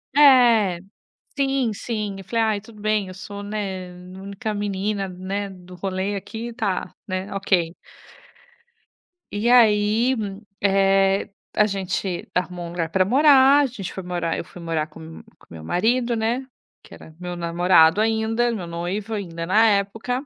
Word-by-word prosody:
É. 240 Hz, -10 st, +6 dB, 0.6 s
Sim, 270 Hz, -4 st, +1 dB
sim. 210 Hz, -2 st, -4 dB
Eu 195 Hz, -, -9 dB
falei: 225 Hz, +4 st, 0 dB
"Ai, 215 Hz, -2 st, 0 dB
tudo 215 Hz, 0 st, -15 dB
bem, 215 Hz, -2 st, 0 dB
eu 185 Hz, -, -9 dB
sou, 200 Hz, +1 st, -8 dB
né, 195 Hz, -3 st, -4 dB, 0.3 s
a -, -, -10 dB
única 200 Hz, +2 st, -4 dB
menina, 205 Hz, 0 st, -2 dB
né, 190 Hz, +2 st, -4 dB
do 180 Hz, -1 st, -13 dB
rolê 190 Hz, +2 st, -2 dB
aqui. 225 Hz, +4 st, -6 dB
Tá, 200 Hz, -6 st, -2 dB
né, 185 Hz, +1 st, -4 dB
ok". 180 Hz, -4 st, 0 dB, 1.6 s
E 210 Hz, +4 st, 0 dB
aí, 225 Hz, +1 st, +4 dB, 0.5 s
eh, 195 Hz, 0 st, +3 dB, 0.2 s
a 210 Hz, -, +4 dB
gente 190 Hz, -2 st, -3 dB
arrumou 180 Hz, -1 st, -2 dB
um -, -, -7 dB
lugar 170 Hz, -2 st, -3 dB
para 185 Hz, +3 st, +3 dB
morar, 275 Hz, +4 st, +6 dB
a 285 Hz, -, +4 dB
gente 220 Hz, -8 st, -6 dB
foi 190 Hz, -, -5 dB
morar 175 Hz, -2 st, -2 dB
eu -, -, -5 dB
fui 175 Hz, -, -12 dB
morar 165 Hz, -2 st, -2 dB
com 160 Hz, +1 st, -14 dB
m 160 Hz, 0 st, -10 dB, 0.2 s
com -, -, -23 dB
meu 80 Hz, -1 st, -9 dB
marido, 235 Hz, -, +1 dB
né, 235 Hz, +4 st, -1 dB, 0.4 s
que -, -, -16 dB
era 160 Hz, -, -13 dB
meu 180 Hz, 0 st, -5 dB
namorado 170 Hz, +1 st, +4 dB
ainda, 225 Hz, +2 st, +1 dB
meu 190 Hz, -6 st, -4 dB
noivo 180 Hz, +6 st, -4 dB
ainda, 170 Hz, -5 st, -4 dB
na 215 Hz, +5 st, +4 dB
época. 220 Hz, +6 st, 0 dB
200 Hz, 160 wpm, -23 LUFS, 180-220 Hz, 1.6 s, É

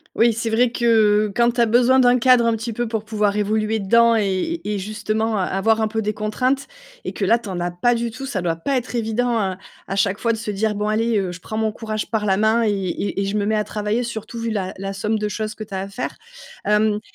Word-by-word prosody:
Oui, 230 Hz, 0 st, +4 dB
c'est 225 Hz, +1 st, -2 dB
vrai 235 Hz, +2 st, +2 dB
que 215 Hz, -3 st, +3 dB
quand 235 Hz, 0 st, +4 dB
tu 240 Hz, 0 st, 0 dB
as -, -, +5 dB
besoin 245 Hz, +3 st, +4 dB
d'un 250 Hz, 0 st, +5 dB
cadre 250 Hz, -1 st, +5 dB
un 230 Hz, -, +3 dB
petit 230 Hz, +1 st, -4 dB
peu 240 Hz, +2 st, -2 dB
pour 220 Hz, -1 st, -3 dB
pouvoir 210 Hz, -1 st, 0 dB
évoluer 215 Hz, +1 st, 0 dB
dedans 230 Hz, +3 st, +4 dB
et 205 Hz, -, -1 dB
et 210 Hz, -1 st, -1 dB
justement 215 Hz, +2 st, -2 dB
a 190 Hz, -, +1 dB
avoir 220 Hz, +4 st, +1 dB
un 220 Hz, -, +1 dB
peu 220 Hz, +1 st, -2 dB
des 210 Hz, 0 st, -1 dB
contraintes 255 Hz, +6 st, -1 dB, 0.4 s
et -, -, -4 dB
que -, -, -4 dB
là 230 Hz, +1 st, +4 dB
tu 230 Hz, -, -11 dB
en 185 Hz, -2 st, -4 dB
as 175 Hz, 0 st, -1 dB
pas 235 Hz, +8 st, +1 dB
du 235 Hz, 0 st, -2 dB
tout, 270 Hz, +3 st, -7 dB
ça 210 Hz, -9 st, -3 dB
doit 165 Hz, -2 st, -1 dB
pas 270 Hz, +11 st, -1 dB
être 245 Hz, 0 st, -3 dB
évident 235 Hz, +1 st, 0 dB
à 190 Hz, -3 st, -1 dB, 0.3 s
à 195 Hz, -, -3 dB
chaque 200 Hz, 0 st, +1 dB
fois 230 Hz, -1 st, +1 dB
de -, -, -3 dB
se 215 Hz, -1 st, -4 dB
dire: 210 Hz, +1 st, -1 dB
«Bon, 210 Hz, +1 st, -1 dB
allez, 225 Hz, +1 st, +1 dB
heu, 190 Hz, -3 st, -1 dB
je 180 Hz, -, -9 dB
prends 215 Hz, -, -7 dB
mon 220 Hz, -1 st, 0 dB
courage 215 Hz, 0 st, -5 dB
par 215 Hz, -2 st, 0 dB
la 190 Hz, -2 st, +3 dB
main 220 Hz, +3 st, +2 dB
et 210 Hz, -, +2 dB
et 195 Hz, +1 st, -2 dB
et -, -, 0 dB
je 200 Hz, +2 st, -1 dB
me 205 Hz, -, 0 dB
mets 215 Hz, +1 st, +1 dB
à 210 Hz, -, +1 dB
travailler». 210 Hz, +3 st, -2 dB
Surtout 230 Hz, 0 st, -6 dB
vu 230 Hz, 0 st, -2 dB
la 190 Hz, -3 st, -2 dB
la 195 Hz, 0 st, -4 dB
somme 210 Hz, +3 st, -1 dB
de 210 Hz, 0 st, -2 dB
choses 215 Hz, +1 st, -4 dB
que 215 Hz, -, -6 dB
tu 205 Hz, -2 st, -12 dB
as 190 Hz, -, -2 dB
à 195 Hz, -, -4 dB
faire. 200 Hz, +5 st, -5 dB, 0.5 s
Hem, 210 Hz, 0 st, +2 dB
215 Hz, 275 wpm, -21 LUFS, 205-230 Hz, 0.5 s, as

